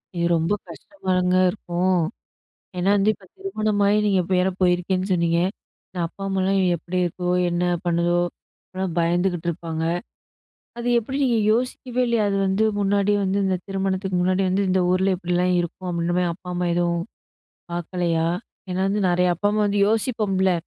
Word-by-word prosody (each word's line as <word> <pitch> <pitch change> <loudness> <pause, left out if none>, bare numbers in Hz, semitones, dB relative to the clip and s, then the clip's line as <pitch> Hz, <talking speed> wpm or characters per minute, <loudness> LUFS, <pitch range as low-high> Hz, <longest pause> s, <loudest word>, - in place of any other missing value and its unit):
ஐயோ! 170 0 0
ரொம்ப 165 +5 0 0.2
கஷ்டமாலங்க 185 - -1
இருக்கும். 180 -2 0 0.8
ஏன்னா, 185 +3 +2
வந்து 200 +1 +3
இப்ப 200 - -20
திருமணமாகி 215 - +1
நீங்க 195 -2 +3
இப்ப 180 - -5
வேற 190 +1 +2
போயிருக்கேன்னு 185 +1 +1
சொன்னீங்க. 170 -1 +2 0.5
நா 180 - -3
அப்பா, 195 - -12
அம்மாலாம் 195 0 +1 0.2
எப்பிடி 175 +3 -4
இருக்கோ! 180 +1 -3 0.2
என்ன 175 +1 0 0.2
பண்ணுதோ! 175 +1 +2 0.4
அப்பிடிலாம் 185 -2 -4
பயந்துக்கிட்டுருப்பாங்க. 170 -2 -1 0.9
அது 240 +1 -2
எப்பிடி 265 +5 -3
நீங்க 240 -3 +2
யோசிக்கவே 250 +1 -1
இல்லயா! 235 -3 +2
அது 195 - 0
வந்து 190 +3 +2 0.2
முன்னாடியே 205 +1 +2
வந்து 195 +1 0
இந்த 190 -1 +1
திருமணத்துக்கு 190 -1 -1
முன்னாடி 185 +1 +2
வந்து, 195 +2 +1
இந்த 185 0 +2
ஊர்லே 190 +1 +2
இப்பிடிலாம் 180 0 0
இருக்கும், 175 +2 -5
அப்பிடின்றமாரி 175 +1 0
அப்பா, 180 +1 -13
அம்மா 175 0 -1
எதுவும் 170 -1 0 0.7
பார்க்கலயா! 170 -1 -1 0.4
ஏன்னா 180 +1 -1
வந்து 205 +1 0
நிறைய 180 +1 +2
அப்பா, 205 +5 0
அம்மா 215 0 +1
வந்து 205 0 +1
யோசிப்போம்ல. 210 -4 +1
185 Hz, 150 wpm, -23 LUFS, 175-200 Hz, 0.9 s, வந்து